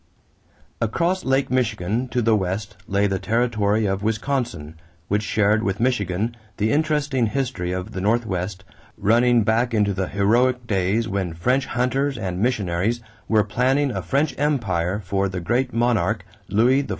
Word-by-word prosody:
= - - -35
Across 175 +7 0
Lake 135 0 +1
Michigan 115 -1 0
to 125 0 -1
the 110 0 +4
west 100 +1 -2
lay 100 0 +1
the 95 -1 0
territory 110 -2 +1
of 95 0 -1
Wisconsin, 110 - -2 0.4
which 105 +1 +1
shared 105 0 +2
with 100 -2 -1
Michigan 110 -2 0 0.2
the 110 +1 +1
interesting 150 -5 +1
history 125 -7 -2
of 95 +3 -4
the 95 - -4
Northwest, 95 -3 -1 0.3
running 120 +2 +3
back 115 +2 +1
into 105 -2 +2
the 95 -1 -2
heroic 120 +5 +2
days 105 +2 0
when 95 -5 -2
French 125 +10 +1
hunters 135 +2 0
and 95 -4 -3
missionaries 105 -2 0 0.3
were 110 -1 +3
planning 130 +7 +1
a - - -3
French 140 +2 0
empire 105 - 0
for 100 0 -1
the 90 -1 -4
great 125 +8 0
monarch, 110 -4 +1 0.2
Louis 125 +6 +4
XIV. 140 - -8
110 Hz, 155 wpm, -22 LUFS, 100-125 Hz, 0.4 s, the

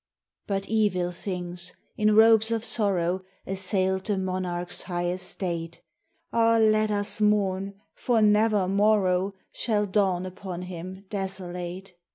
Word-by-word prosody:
But 195 -1 -2
evil 200 -5 +1
things, 180 -1 -5 0.2
in 215 0 +3
robes 220 0 +6
of 225 -1 -1
sorrow, 190 -5 +1 0.2
Assailed 190 0 0
the 205 -2 0
monarch's 185 -2 -2
high 175 -1 -2
estate; 175 -2 -4 0.5
(Ah, 230 0 +4
let 215 -1 +3
us 205 +1 0
mourn, 200 -2 +1 0.2
for 240 -2 +1
never 210 -2 +3
morrow 195 -1 +2 0.2
Shall 210 -3 0
dawn 190 -2 +1
upon 185 -1 -6
him 185 +2 -8
desolate 190 -1 -5
190 Hz, 120 wpm, -26 LUFS, 180-210 Hz, 0.5 s, robes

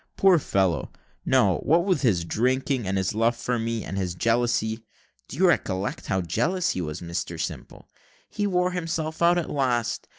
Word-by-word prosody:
Poor 190 -3 +5
fellow, 95 - 0 0.4
no - - +4
what 170 +4 +2
with 190 -3 +1
his 95 - +2
drinking, 130 - 0
and 95 +1 0
his 95 +1 0
love 115 +2 +2
for 120 +1 -2
me 115 -1 -2
and 95 - -4
his 90 -2 -2
jealousy 115 0 0 0.4
(do - - -8
you 185 +2 +4
recollect 100 - -1
how 95 - 0
jealous 170 - 0
he 90 - -3
was, 75 -2 -5
Mr 85 0 -4
Simple?) - - -6 0.4
he 205 -1 -2
wore 180 -1 +1
himself 165 -3 -3
out 170 +1 +5
at 175 - -1
last. 125 -5 -1
120 Hz, 175 wpm, -25 LUFS, -, 0.4 s, Poor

